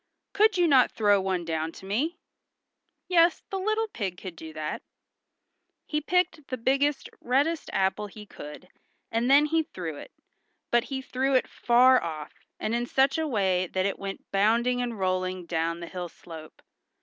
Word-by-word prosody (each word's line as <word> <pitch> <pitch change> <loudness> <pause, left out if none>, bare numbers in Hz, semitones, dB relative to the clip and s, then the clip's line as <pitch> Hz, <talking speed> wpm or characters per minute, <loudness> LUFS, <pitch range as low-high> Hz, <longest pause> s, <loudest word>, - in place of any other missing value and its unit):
"Could 425 -1 +4
you 350 -1 +4
not 265 -5 +5
throw 205 -2 +3
one 185 -2 -1
down 160 0 -2
to - - -12
me?" 265 - -1 0.9
Yes, 345 -1 +4
the 390 - -2
little 435 +3 0
pig 195 - -4
could 185 -2 -8
do 160 0 -9
that. 155 -1 -4 1.0
He 300 -1 -1
picked 340 -2 0
the 255 - -3
biggest, 275 +4 +1
reddest 285 +6 +1
apple 195 +2 0
he 210 +1 -11
could, 150 -1 -10 0.4
and 230 +2 +1
then 285 +2 +7
he 325 +2 +2
threw 170 - -6
it, - - -10 0.6
but 240 -1 +3
he 265 -1 -4
threw 265 +1 0
it 255 - +3
far 250 +2 +4
off, 155 -3 -6 0.3
and 215 - -2
in 240 +1 -1
such 270 +4 +2
a 320 - 0
way 190 -7 +1
that 185 +2 -1
it 200 - -2
went 195 0 -6
bounding 235 +5 +2
and 240 -2 -3
rolling 185 -1 -1
down 165 0 -2
the 170 - -6
hill 180 0 -5
slope. 160 -2 -12
230 Hz, 175 wpm, -27 LUFS, 185-275 Hz, 1.0 s, then